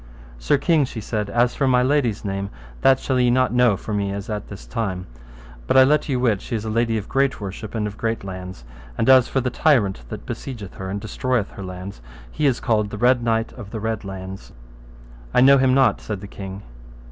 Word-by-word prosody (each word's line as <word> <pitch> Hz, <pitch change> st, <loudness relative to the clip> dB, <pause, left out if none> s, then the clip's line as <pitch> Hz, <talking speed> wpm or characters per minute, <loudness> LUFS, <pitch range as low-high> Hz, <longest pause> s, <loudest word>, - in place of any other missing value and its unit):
Sir 100 Hz, -, +2 dB
king, 155 Hz, +1 st, +3 dB
she 125 Hz, -3 st, -5 dB
said, 105 Hz, -1 st, -3 dB
as 120 Hz, +3 st, +2 dB
for 140 Hz, -, 0 dB
my 125 Hz, -1 st, +4 dB
lady's 125 Hz, -6 st, +1 dB
name 100 Hz, 0 st, -3 dB, 0.3 s
that 135 Hz, -1 st, +5 dB
shall 130 Hz, -, -1 dB
not 125 Hz, +1 st, +3 dB
ye -, -, -3 dB
know 125 Hz, -5 st, +4 dB
for 105 Hz, -, -6 dB
me 100 Hz, -1 st, -1 dB
as 100 Hz, +2 st, -5 dB
at 105 Hz, -1 st, -4 dB
this 100 Hz, -, -10 dB
time, 95 Hz, -6 st, -3 dB, 0.6 s
but -, -, +3 dB
I 130 Hz, -, +9 dB
let 150 Hz, +3 st, +2 dB
you 130 Hz, -3 st, +1 dB
wit 115 Hz, -6 st, +1 dB
she -, -, -4 dB
is 110 Hz, -1 st, -3 dB
a 110 Hz, -, -2 dB
lady 115 Hz, 0 st, +1 dB
of 105 Hz, -, -5 dB
great 135 Hz, 0 st, +1 dB
worship 100 Hz, +2 st, -7 dB
and 110 Hz, -2 st, -1 dB
of 105 Hz, 0 st, -6 dB
great 115 Hz, -2 st, -2 dB
lands; 95 Hz, -6 st, -7 dB, 0.3 s
and -, -, 0 dB
as 130 Hz, -2 st, +7 dB
for 135 Hz, -, 0 dB
the 125 Hz, 0 st, -1 dB
tyrant 115 Hz, -, +2 dB
that -, -, -7 dB
besiegeth 110 Hz, -9 st, -7 dB
her 95 Hz, 0 st, -5 dB
and 100 Hz, +2 st, -3 dB
destroyeth 115 Hz, +1 st, -1 dB
her 100 Hz, -, -8 dB
lands, 90 Hz, -5 st, -8 dB, 0.3 s
he 150 Hz, -, +1 dB
is 130 Hz, -3 st, +1 dB
called 110 Hz, -4 st, +1 dB
the 105 Hz, -, -6 dB
Red 125 Hz, +2 st, +3 dB
Knight 115 Hz, -1 st, 0 dB
of 110 Hz, -6 st, -10 dB
the 110 Hz, -, -5 dB
Red 110 Hz, 0 st, -2 dB
Launds. 95 Hz, -1 st, -8 dB, 0.8 s
I -, -, +6 dB
know 135 Hz, +1 st, +7 dB
him 130 Hz, 0 st, +3 dB
not, 135 Hz, -1 st, +3 dB
said 105 Hz, -3 st, -5 dB
the 100 Hz, -, -8 dB
king. 95 Hz, 0 st, -8 dB
115 Hz, 230 wpm, -22 LUFS, 100-130 Hz, 0.8 s, I